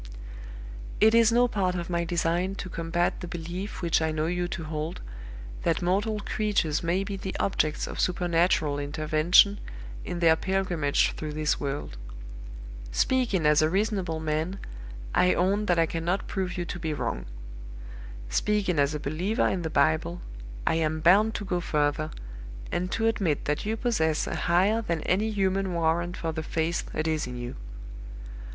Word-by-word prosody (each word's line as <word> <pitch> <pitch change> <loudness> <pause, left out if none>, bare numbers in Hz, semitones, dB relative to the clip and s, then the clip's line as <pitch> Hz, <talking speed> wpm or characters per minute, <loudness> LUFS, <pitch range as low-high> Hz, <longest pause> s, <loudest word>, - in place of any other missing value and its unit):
"It 220 +1 +6
is 230 -1 +6
no 245 +1 +4
part 190 -5 0
of 170 -1 -3
my 170 -1 -1
design 175 +2 0
to 185 - -6
combat 170 +1 -1
the 180 - -6
belief 175 +4 -6
which 170 -1 +2
I 160 - +1
know 155 0 -1
you 175 +1 -1
to 175 -1 -5
hold, 155 +2 -4 0.6
that 170 +2 0
mortal 205 +4 +1
creatures 200 -8 0
may 175 +3 0
be 200 0 -4
the 190 0 -5
objects 155 -6 0
of - - -7
supernatural 170 -4 +1
intervention 155 +7 +3 0.4
in 175 - -4
their 165 -2 +5
pilgrimage 180 -5 +1
through 155 -1 -6
this 155 0 0
world. 140 - -4 0.9
Speaking 225 - +1
as 150 0 +5
a 155 - +3
reasonable 190 -4 0
man, 160 +4 -2 0.6
I 180 - +4
own 200 +4 +1
that 175 - +3
I 165 - +4
cannot 170 +4 -2
prove 185 -2 -3
you 175 - -2
to 175 - -6
be 160 -3 -2
wrong. - - -3 1.0
Speaking 180 - +1
as 140 +2 +2
a - - -3
believer 175 - 0
in 185 - -1
the 160 - -3
Bible, 155 +4 +1 0.5
I - - +2
am 155 0 0
bound 205 +7 +5
to 205 - -3
go 180 -1 -1
further, 150 -1 0 0.6
and 180 +1 -2
to 225 - 0
admit 195 -10 0
that 150 +7 -1
you 220 +1 -1
possess 160 -11 +1
a - - -4
higher 190 +6 +2
than 170 -7 -2
any 205 +7 +1
human 195 -3 0
warrant 170 +2 0
for 165 - -2
the 160 0 -4
faith 160 +2 -2
that 155 +1 -1
is 155 -3 0
in 125 0 -6
you. 120 0 -6
175 Hz, 170 wpm, -27 LUFS, 155-195 Hz, 1.0 s, It